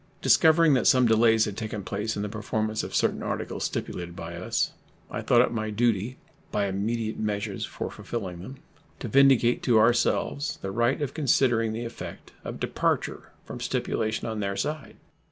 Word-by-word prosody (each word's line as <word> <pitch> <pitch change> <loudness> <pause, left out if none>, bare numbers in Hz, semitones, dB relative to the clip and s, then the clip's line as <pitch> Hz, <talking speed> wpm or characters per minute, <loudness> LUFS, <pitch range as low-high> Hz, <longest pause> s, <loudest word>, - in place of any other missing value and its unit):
Discovering 160 -1 +5
that 130 - +2
some 130 -1 +5
delays 110 0 +4
had 105 - -5
taken 110 -2 -5
place 105 +3 -3
in 100 - -3
the - - -2
performance 110 +1 -2
of - - -6
certain - - +1
articles - - -3
stipulated 85 -1 -4
by 85 0 -7
us, 90 +2 -1 0.4
I - - -3
thought 120 - +4
it 125 - +1
my 110 -2 -2
duty, 115 +2 0 0.3
by 105 - +1
immediate 110 +3 -2
measures 105 -1 -2
for - - -6
fulfilling 95 -7 -5
them, 130 +9 -9 0.4
to - - -6
vindicate 135 -3 +4
to 120 -3 +3
ourselves 120 +5 +2
the 95 - -3
right 120 +5 +1
of 140 - -3
considering 120 -6 +2
the 115 +2 -4
effect 115 - -8
of - - -6
departure - - -1
from - - -7
stipulation 110 0 -2
on 110 -1 -3
their 100 -1 -2
side. 150 0 -3
110 Hz, 170 wpm, -26 LUFS, 105-120 Hz, 0.4 s, Discovering